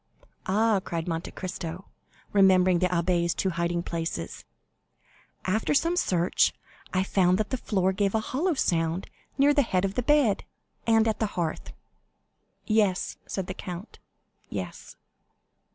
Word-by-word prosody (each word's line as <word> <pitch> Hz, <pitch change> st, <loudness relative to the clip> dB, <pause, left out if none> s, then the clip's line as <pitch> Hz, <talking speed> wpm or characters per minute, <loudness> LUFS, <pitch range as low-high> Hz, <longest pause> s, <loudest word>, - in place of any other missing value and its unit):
"Ah," 215 Hz, +1 st, +3 dB
cried 165 Hz, 0 st, -4 dB
Monte 165 Hz, 0 st, -3 dB
Cristo, 180 Hz, -1 st, -6 dB, 0.5 s
remembering 185 Hz, -2 st, +5 dB
the 185 Hz, -, +3 dB
abbé's 170 Hz, -1 st, +1 dB
two 190 Hz, -, 0 dB
hiding 170 Hz, 0 st, -1 dB
places. 165 Hz, -, -4 dB, 1.0 s
"After 215 Hz, +9 st, +1 dB
some 335 Hz, +5 st, +2 dB
search, 180 Hz, -, +2 dB, 0.4 s
I 185 Hz, 0 st, +1 dB
found 185 Hz, -2 st, +3 dB
that 215 Hz, 0 st, -2 dB
the -, -, +1 dB
floor 190 Hz, -5 st, +1 dB
gave 200 Hz, +1 st, 0 dB
a -, -, +3 dB
hollow 305 Hz, +10 st, -1 dB
sound 165 Hz, -5 st, 0 dB, 0.3 s
near 285 Hz, +2 st, +5 dB
the 290 Hz, -, +4 dB
head 190 Hz, -7 st, +1 dB
of 195 Hz, -, -2 dB
the 250 Hz, -, 0 dB
bed, 270 Hz, -6 st, +3 dB, 0.4 s
and 225 Hz, 0 st, +4 dB
at 220 Hz, -, 0 dB
the 220 Hz, -, +1 dB
hearth." 165 Hz, -3 st, -2 dB, 0.9 s
"Yes," 210 Hz, -4 st, +1 dB
said 190 Hz, -, -3 dB
the 185 Hz, -, -5 dB
count, 180 Hz, +2 st, -8 dB, 0.5 s
"yes." -, -, -6 dB
190 Hz, 140 wpm, -27 LUFS, 175-220 Hz, 1.0 s, remembering